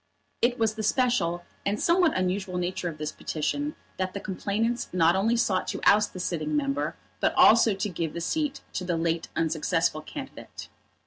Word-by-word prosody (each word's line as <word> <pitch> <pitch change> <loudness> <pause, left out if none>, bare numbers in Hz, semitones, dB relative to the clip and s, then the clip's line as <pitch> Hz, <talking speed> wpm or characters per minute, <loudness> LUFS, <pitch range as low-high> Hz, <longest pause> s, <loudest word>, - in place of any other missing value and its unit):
It 245 +1 +2
was 225 -1 +1
the 220 - -5
special 215 -7 +1 0.2
and 205 +2 -1
somewhat 340 - +3
unusual 185 0 -1
nature 180 0 -2
of 155 - -8
this 155 0 -3
petition 290 - -2 0.2
that 185 0 -2
the - - -2
complainants 215 +5 -2
not 170 -1 +4
only 225 +5 +2
sought 195 -5 +1
to - - -3
oust 210 0 +5
the 185 - -7
sitting 155 -4 -1
member, 145 -1 -1 0.2
but - - +1
also 225 -2 +6
to 195 - -2
give 165 -4 -3
the - - -2
seat 290 - -1
to 185 - -2
the 175 -2 -1
late 165 0 -1
unsuccessful 160 0 0
candidate. 270 - -9
185 Hz, 180 wpm, -27 LUFS, 165-225 Hz, 0.2 s, also